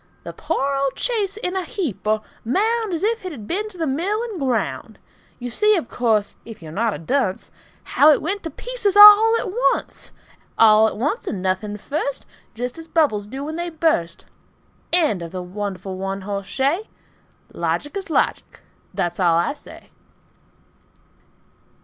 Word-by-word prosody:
The - - -7
poor 275 +1 -2
old 275 -1 -1
chaise 420 -5 -1
in 365 -3 -3
a 380 - -1
heap 345 - -4
or 215 0 +1 0.2
mound, 435 - 0
As 340 +1 -3
if 450 +1 0
it 370 - -5
had 235 -9 -9
been 415 - -2
to 380 - -14
the 330 - -1
mill 360 - -1
and 440 -7 -6
ground! 255 -5 -2 0.4
You 245 0 -6
see, 425 - +3
of 315 - -4
course, 220 -4 0
if 225 -2 -11
you're 160 -2 -10
not 220 +5 0
a - - -5
dunce, 190 - -2 0.3
How 300 - +4
it 300 - +5
went 395 +5 -3
to 325 - -5
pieces 455 -1 -2
all 420 +2 +10
at 405 - -4 0.2
once, - - -7 0.5
All 220 -1 +6
at - - -4
once, 300 - -2
and 200 - -3
nothing 190 +3 -2
first, 280 +5 -4 0.3
Just 245 +5 -5
as 325 - -10
bubbles 285 -12 +1
do 265 +5 -6
when 310 +2 -5
they 345 0 -3
burst. 310 - -1 0.7
End 310 - +3
of 165 -1 -7
the 185 -1 -5
wonderful 190 0 -5
one 195 +1 -4
hoss 200 0 -5
shay. 295 +11 -1 0.6
Logic 290 - -2
is 390 -3 -5
logic. 315 - -1 0.3
That's 175 +1 -2
all 170 -3 +3
I 170 +10 +1
say. - - -15
280 Hz, 175 wpm, -21 LUFS, -, 0.7 s, all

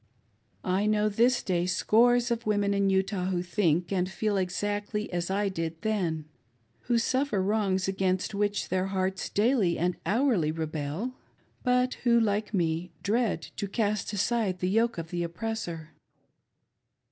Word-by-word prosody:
I 190 +3 +1
know 215 0 +2
this 235 +4 +2
day 175 -2 0
scores 240 +6 +3
of 235 -1 -2
women 205 -1 +2
in 200 -1 +2
Utah 190 -1 0
who 180 -2 -1
think 175 -2 +1
and 185 -1 0
;feel 210 +2 -1
^exactly 205 +3 -1
as 175 0 -2
I 200 +1 +1
did 165 -3 -3
then, 175 -8 -1 0.6
who 240 -1 +2
suffer 260 -1 +1
wrongs 190 -1 +1
against 190 0 0
which 205 0 -1
their 185 +1 0
hearts 190 -1 -2
daily 210 -5 +2
and 175 +1 0
hourly 215 - +2
rebel, 160 - -3 0.5
but 250 0 +2
who, 235 -1 +5
like 210 -1 0
me, 170 -3 0
dread 215 -5 +1
to 200 - -2
cast 210 -1 -1
aside 205 -1 0
the 180 0 -1
yoke 230 +2 +2
of 165 +1 -6
the 175 -1 -2
oppressor. 170 -3 -4
200 Hz, 145 wpm, -28 LUFS, 180-220 Hz, 0.6 s, who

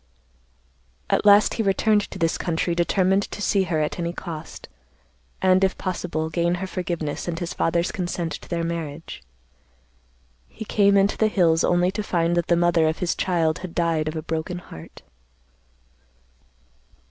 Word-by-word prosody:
"At - - +2
last 205 +1 +6
he - - -1
returned 205 +1 +2
to - - -8
this 165 -2 +1
country 170 0 -1
determined 185 +3 +2
to - - -7
see 195 -1 +1
her 165 -3 -1
at 150 +3 -2
any 170 0 -2
cost, 165 -3 -8 0.8
and, 185 0 +4
if 190 - +1
possible, 170 -4 -3
gain 170 +2 +1
her 185 +2 -4
forgiveness 170 -5 -4
and 170 -1 -2
his 170 0 -4
father's 170 +1 0
consent 175 -3 -3
to - - -8
their 170 -1 -1
marriage. 165 - -5 1.3
He 220 - -9
came 200 -1 +3
into 200 +1 +2
the 220 - +3
hills 170 -6 +2
only 175 +1 +2
to 210 +2 -3
find 170 -4 0
that 175 -1 0
the 170 - +3
mother 170 -2 +3
of 160 - -1
his 180 -2 -1
child 165 -4 0
had 185 -2 -8
died 165 -3 0
of 155 - -3
a 155 - -4
broken 160 +3 -3
heart. 80 - -12
175 Hz, 165 wpm, -23 LUFS, 165-190 Hz, 1.3 s, last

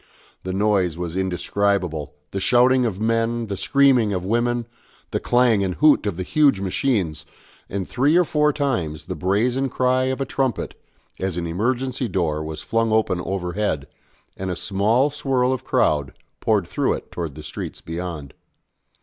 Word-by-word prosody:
The 95 - -4
noise 95 -4 +1
was 85 -1 -4
indescribable, 90 -5 -1 0.2
the 95 - -2
shouting 125 +4 +4
of 100 -4 -4
men, 115 +1 0
the 100 -2 -4
screaming 125 +1 +3
of 90 -1 -2
women, 120 +3 0 0.5
the - - 0
clang 120 -4 +3
and 90 -2 -1
hoot 150 -8 +4
of 95 -5 -2
the 90 - -2
huge 140 0 +3
machines, 95 - -1 0.5
and 95 -1 -3
three 145 +7 +2
or 180 - +6
four 150 -2 +2
times 105 - -2
the - - -4
brazen 120 +8 0
cry 130 +1 +1
of 130 +1 -1
a 135 - 0
trumpet, 130 -1 -1 0.5
as 95 -2 -2
an 85 - -2
emergency 125 +8 -1
door 80 -6 -1
was 80 0 -6
flung 115 0 0
open 110 -5 +1
overhead, 90 -5 -2 0.5
and 95 0 -4
a 90 - -2
small 110 - +1
swirl 130 -3 +1
of 130 - -4
crowd 70 -3 +1 0.3
poured 105 -5 +1
through - - 0
it - - -7
towards 80 -5 -5
the - - -9
streets - - -6
beyond. 80 -4 -6
105 Hz, 165 wpm, -22 LUFS, 90-125 Hz, 0.5 s, or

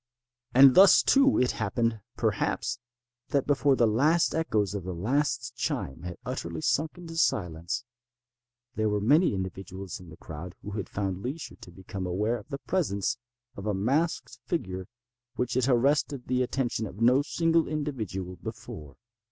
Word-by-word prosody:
And 135 0 +9
thus, 195 +5 +8
too, 275 0 +5
it 125 - +3
happened, 115 -2 -1 0.2
perhaps, 120 0 -1 0.5
that 140 -3 +1
before 145 -1 +3
the 120 - +4
last 145 +10 +3
echoes 110 -11 0
of 100 -3 -4
the 90 0 -5
last 135 - 0
chime 70 +4 -3
had 90 -1 -6
utterly 85 -2 -4
sunk 155 - 0
into 165 -2 -9
silence, 90 - 0 0.9
there 110 -4 0
were 105 0 +1
many 145 - +4
individuals 95 0 -6
in 90 -2 -13
the 80 - -12
crowd 85 +3 -8
who 105 - -6
had 100 -1 -4
found 95 -2 -3
leisure 140 +8 -5
to - - -13
become 95 +1 -6
aware 105 +7 0
of 105 - -16
the 140 - -3
presence 120 - -1 0.4
of 100 +2 -6
a 105 - +1
masked 140 - 0
figure 95 - -3 0.5
which 125 0 -1
had 130 0 +2
arrested 140 +1 +2
the 125 0 0
attention 125 -3 -1
of 100 - -11
no 125 +4 +5
single 165 +2 +1
individual 110 - -4
before. 75 -4 -8
115 Hz, 160 wpm, -28 LUFS, 95-140 Hz, 0.9 s, And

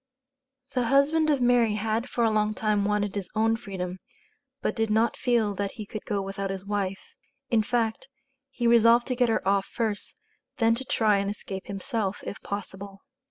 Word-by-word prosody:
The 250 -2 +1
husband 285 +5 +3
of 285 -4 +2
Mary 240 -3 +4
had 220 +4 -1
for 240 - 0
a 225 - +3
long 215 0 +1
time 210 -2 +1
wanted 205 -1 0
his 200 -3 -4
own 225 +1 +3
freedom, 190 -5 -5 0.6
but - - -1
did 225 -1 0
not 220 +1 +2
feel 230 -4 +1
that 200 0 -3
he 215 -4 -7
could 215 +1 -7
go 200 -2 -1
without 195 0 -4
his 190 0 -5
wife; 200 -2 -3 0.4
in 230 -2 +4
fact, 230 +1 -1 0.4
he 250 -3 -4
resolved 235 0 +6
to 255 - 0
get 245 -1 +2
her 225 - 0
off 195 0 +2
first, 220 -3 -3 0.4
then 230 -3 +4
to 255 +3 -4
try 215 -4 +3
and 200 0 -1
escape 195 -2 -6
himself, 200 0 -2
if - - -6
possible. 200 -1 -7
215 Hz, 185 wpm, -27 LUFS, 200-235 Hz, 0.6 s, resolved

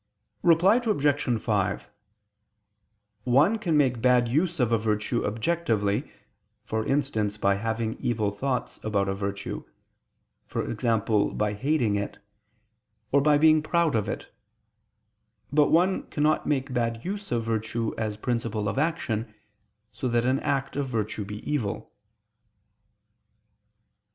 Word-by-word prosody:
Reply 175 +6 +5
Obj. 145 - +1
5: 105 -2 -1 1.3
One 145 - +3
can 170 -8 +1
make 125 -5 +2
bad 125 -1 +4
use 160 +7 0
of 120 -2 +2
a 115 - +4
virtue 105 +2 0
objectively, 110 -3 0 0.5
for 110 0 -1
instance 110 -7 0
by 100 -1 +2
having 110 +2 -2
evil 110 -4 0
thoughts 125 +4 -3
about 100 -2 0
a 95 - 0
virtue, 100 0 -4 0.9
e.g. 115 0 0 0.4
by 105 -1 0
hating 120 -2 +1
it, 100 - -4 0.9
or 140 - +4
by 150 +1 +4
being 155 +1 +5
proud 165 0 +1
of 105 -2 0
it: - - -6 1.2
but 150 0 +4
one 180 +4 +2
cannot 150 +1 +1
make 135 -2 -1
bad 115 -2 -1
use 200 +2 -5
of 120 -1 0
virtue 115 0 -2
as 110 -2 -3
principle 115 -2 -2
of 110 - -1
action, 120 -9 -1 0.6
so 130 - -3
that 120 -1 +1
an 130 +2 +2
act 135 -1 -1
of 140 -1 -1
virtue 110 -3 -2
be 105 +2 -8
evil. 120 -9 -2
120 Hz, 125 wpm, -26 LUFS, 110-145 Hz, 1.3 s, Reply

